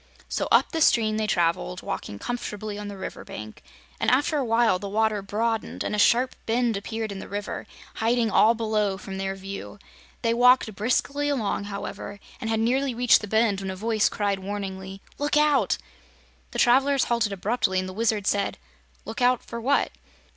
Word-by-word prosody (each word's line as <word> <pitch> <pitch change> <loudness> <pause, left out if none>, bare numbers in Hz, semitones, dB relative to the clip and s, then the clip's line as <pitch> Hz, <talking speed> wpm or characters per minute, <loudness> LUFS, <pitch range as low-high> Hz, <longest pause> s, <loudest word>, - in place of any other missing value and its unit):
So - - -2
up - - +4
the 325 - -2
stream 215 -6 +4
they 215 -1 0
traveled, 165 - 0
walking 100 - -5
comfortably 210 - -5
on 210 - -6
the 200 -1 -7
river 190 - -6
bank, 110 0 -9 0.4
and - - +2
after 290 +5 +2
a - - 0
while 230 -5 +3
the 200 - -5
water 215 0 +1
broadened 220 +3 -2
and - - -3
a - - -1
sharp 245 +5 +4
bend 235 0 +1
appeared 220 +2 -4
in 195 - -6
the - - -8
river, 205 0 -5 0.3
hiding 230 0 +1
all 225 +4 +5
below 215 -3 0
from 190 -1 -7
their 195 0 -2
view. 195 +1 -7 0.5
They 230 0 +2
walked 245 -2 +5
briskly 280 +7 0
along, 220 -7 -1
however, 200 0 -6 0.2
and 225 -3 -4
had 225 -1 +1
nearly 255 +2 +1
reached 245 0 +5
the 210 - -6
bend 220 -2 +2
when 190 - -4
a 190 - -4
voice 215 +2 +1
cried 200 -2 -1
warningly: 195 -1 -6 0.2
"Look 290 +1 +1
out!" 300 -2 +3 0.7
The - - -7
travelers 270 +2 +4
halted 235 -3 +1
abruptly 195 -1 0
and 185 - -3
the 185 - -7
Wizard 215 -1 0
said: 200 0 0 0.5
"Look 230 - -6
out 245 0 +3
for 235 - -7
what?" 280 +4 +2
220 Hz, 185 wpm, -25 LUFS, 200-240 Hz, 0.7 s, all